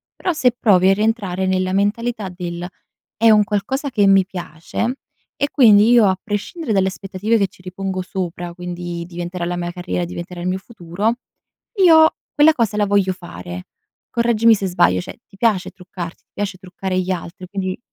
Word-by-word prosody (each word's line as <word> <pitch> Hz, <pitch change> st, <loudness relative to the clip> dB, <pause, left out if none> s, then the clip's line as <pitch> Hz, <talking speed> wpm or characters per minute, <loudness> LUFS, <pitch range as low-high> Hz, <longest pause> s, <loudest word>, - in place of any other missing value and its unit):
Però, 365 Hz, -, -1 dB
se 255 Hz, -5 st, +3 dB
provi 190 Hz, -5 st, +4 dB
a -, -, +6 dB
rientrare 200 Hz, -3 st, 0 dB
nella 185 Hz, 0 st, 0 dB
mentalità 210 Hz, +1 st, -1 dB
del: 175 Hz, -1 st, -6 dB, 0.5 s
"È 225 Hz, +1 st, +4 dB
un 210 Hz, -1 st, +6 dB
qualcosa 245 Hz, +8 st, -2 dB
che 210 Hz, -6 st, +2 dB
mi 195 Hz, -1 st, +5 dB
piace 180 Hz, +6 st, -4 dB, 0.5 s
e 285 Hz, -, +2 dB
quindi, 220 Hz, -5 st, +6 dB
io 240 Hz, -3 st, +6 dB
a 190 Hz, 0 st, 0 dB
prescindere 220 Hz, -, -3 dB
dalle 190 Hz, -1 st, +3 dB
aspettative 200 Hz, +4 st, -1 dB
che 200 Hz, -, +2 dB
ci 185 Hz, -, -21 dB
ripongo 185 Hz, +1 st, -4 dB
sopra, 175 Hz, -2 st, -5 dB
quindi: 175 Hz, -1 st, -6 dB
diventerà 175 Hz, 0 st, -5 dB
la 175 Hz, +1 st, -2 dB
mia 175 Hz, 0 st, -3 dB
carriera, 180 Hz, 0 st, -3 dB
diventerà 175 Hz, +1 st, -7 dB
il 175 Hz, -, -3 dB
mio 185 Hz, +1 st, 0 dB
futuro, 200 Hz, +1 st, -3 dB, 0.6 s
io 325 Hz, -5 st, +6 dB, 0.2 s
quella 305 Hz, +2 st, +6 dB
cosa 230 Hz, -6 st, 0 dB
la 210 Hz, -, +3 dB
voglio 200 Hz, -2 st, +2 dB
fare." 90 Hz, -, -9 dB, 0.4 s
Correggimi 230 Hz, -1 st, +4 dB
se 200 Hz, -, -3 dB
sbaglio, 90 Hz, -, +3 dB
cioè, -, -, -10 dB
ti 195 Hz, -, -19 dB
piace 210 Hz, -5 st, +1 dB
truccarti, 180 Hz, -2 st, -9 dB
ti -, -, -65 dB
piace 200 Hz, -2 st, -3 dB
truccare 185 Hz, 0 st, -4 dB
gli 185 Hz, +1 st, -2 dB
altri? 180 Hz, 0 st, -6 dB
Quindi 185 Hz, 0 st, -4 dB
190 Hz, 175 wpm, -20 LUFS, 180-215 Hz, 0.6 s, a